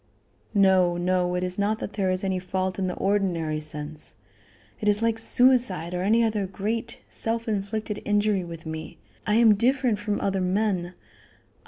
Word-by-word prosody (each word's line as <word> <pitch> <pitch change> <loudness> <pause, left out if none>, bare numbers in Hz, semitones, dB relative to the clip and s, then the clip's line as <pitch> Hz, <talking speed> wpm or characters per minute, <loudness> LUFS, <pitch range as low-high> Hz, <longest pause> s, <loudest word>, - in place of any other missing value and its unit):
"No, 190 -3 +4
no; 180 0 0
it 180 - -1
is 180 +1 -2
not 210 +2 +1
that 210 - -6
there 195 -2 0
is 185 +1 -1
any 190 -1 0
fault 185 +1 -3
in 190 - 0
the 180 - -3
ordinary 175 -6 0
sense; 150 0 -5 0.6
it 210 - -3
is 210 +2 +3
like 225 -1 +1
suicide 230 -9 +3
or 180 - -2
any 225 +5 +3
other 210 -3 0
great, 220 +5 -3
self 230 +1 -1
inflicted 210 0 -3
injury 205 -2 +1
with 170 -1 -9
me. 160 0 -7 0.3
I 210 - +2
am 225 -1 +6
different 245 0 +1
from 205 0 -2
other 195 -1 -1
men. 185 -2 -1
195 Hz, 170 wpm, -25 LUFS, 180-215 Hz, 0.6 s, am